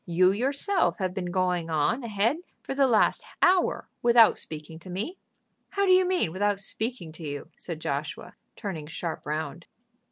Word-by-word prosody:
You 180 Hz, +2 st, +4 dB
yourself 280 Hz, -, +1 dB
have 185 Hz, -2 st, -2 dB
been 180 Hz, -2 st, -3 dB
going 180 Hz, -2 st, 0 dB
on 160 Hz, -, +1 dB
ahead 225 Hz, +5 st, +1 dB, 0.3 s
for -, -, -4 dB
the 275 Hz, 0 st, +4 dB
last 225 Hz, -4 st, +3 dB, 0.2 s
hour 365 Hz, 0 st, +3 dB
without 235 Hz, -2 st, +6 dB
speaking 155 Hz, +1 st, -7 dB
to 185 Hz, -, -12 dB
me." 215 Hz, -, -4 dB, 0.5 s
"How 400 Hz, 0 st, +1 dB
do 375 Hz, -, +4 dB
you 370 Hz, 0 st, +6 dB
mean 360 Hz, -, +1 dB
without 200 Hz, +2 st, +1 dB
speaking 220 Hz, -3 st, -2 dB
to 165 Hz, +1 st, -10 dB
you?" 145 Hz, +1 st, -5 dB
said 165 Hz, -3 st, -7 dB
Joshua, 145 Hz, -1 st, -4 dB, 0.2 s
turning 165 Hz, -7 st, -5 dB
sharp 165 Hz, 0 st, -5 dB
round. 160 Hz, +3 st, -4 dB
190 Hz, 165 wpm, -27 LUFS, 165-245 Hz, 0.5 s, without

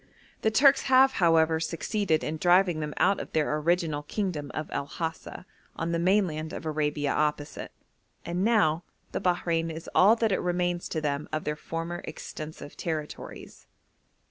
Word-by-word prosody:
The 220 Hz, -, +3 dB
Turks 270 Hz, +5 st, +5 dB
have, 265 Hz, +1 st, +6 dB
however, 160 Hz, -1 st, +4 dB
succeeded 165 Hz, +1 st, -1 dB
in 155 Hz, +1 st, -3 dB
driving 175 Hz, 0 st, +3 dB
them 150 Hz, -1 st, -4 dB
out 200 Hz, -, +3 dB
of -, -, -7 dB
their 150 Hz, -1 st, +1 dB
original 160 Hz, -1 st, 0 dB
kingdom 150 Hz, -3 st, -3 dB
of 155 Hz, -, -3 dB
El 140 Hz, -, -3 dB
Hasa, 165 Hz, +3 st, -5 dB, 0.3 s
on 165 Hz, +1 st, -2 dB
the 170 Hz, -, 0 dB
mainland 170 Hz, -4 st, +1 dB
of -, -, -6 dB
Arabia 150 Hz, -2 st, -1 dB
opposite, 150 Hz, -1 st, -2 dB, 0.5 s
and 175 Hz, +2 st, -1 dB
now 190 Hz, -8 st, +3 dB, 0.3 s
the -, -, -3 dB
Bahrein 170 Hz, -2 st, 0 dB
is 160 Hz, +1 st, -7 dB
all 205 Hz, +5 st, +6 dB
that 225 Hz, -4 st, +1 dB
remains 175 Hz, 0 st, -1 dB
to 160 Hz, -, -2 dB
them 145 Hz, -1 st, -2 dB
of 155 Hz, 0 st, -2 dB
their 150 Hz, -, -2 dB
former 165 Hz, +3 st, -5 dB
extensive 155 Hz, -2 st, -8 dB
territories. 155 Hz, -3 st, -6 dB
165 Hz, 155 wpm, -27 LUFS, 155-180 Hz, 0.5 s, have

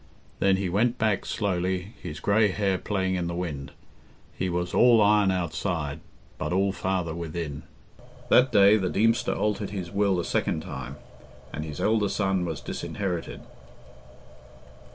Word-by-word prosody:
Then 95 Hz, -1 st, +3 dB
he 95 Hz, -1 st, -1 dB
went 115 Hz, +7 st, +1 dB
back 110 Hz, -3 st, 0 dB
slowly, 95 Hz, 0 st, -1 dB
his 80 Hz, -5 st, -6 dB
grey 105 Hz, +7 st, +3 dB
hair 95 Hz, -1 st, 0 dB
playing 95 Hz, -2 st, -1 dB
in 90 Hz, -2 st, -1 dB
the 85 Hz, -, -3 dB
wind. 75 Hz, -6 st, -4 dB, 0.6 s
He 95 Hz, -, -2 dB
was 90 Hz, 0 st, -2 dB
all 120 Hz, -2 st, +6 dB
iron 105 Hz, -1 st, +4 dB
outside, 85 Hz, -4 st, -2 dB, 0.4 s
but 75 Hz, -, -2 dB
all 95 Hz, +2 st, +2 dB
father 95 Hz, -4 st, -2 dB
within. 80 Hz, -3 st, -5 dB, 0.7 s
That 125 Hz, +1 st, +5 dB
day 100 Hz, +1 st, +6 dB
the 95 Hz, -3 st, -1 dB
Deemster 115 Hz, +5 st, +2 dB
altered 105 Hz, -1 st, -1 dB
his 95 Hz, -3 st, -5 dB
will 100 Hz, -2 st, +1 dB
a 85 Hz, -, -2 dB
second 80 Hz, -, -1 dB
time, 65 Hz, -1 st, -7 dB, 0.6 s
and 75 Hz, -, -4 dB
his 75 Hz, -2 st, -7 dB
elder 110 Hz, -2 st, +2 dB
son 95 Hz, -3 st, 0 dB
was 80 Hz, -3 st, -4 dB
disinherited. 90 Hz, -4 st, -4 dB
95 Hz, 150 wpm, -26 LUFS, 85-100 Hz, 0.7 s, all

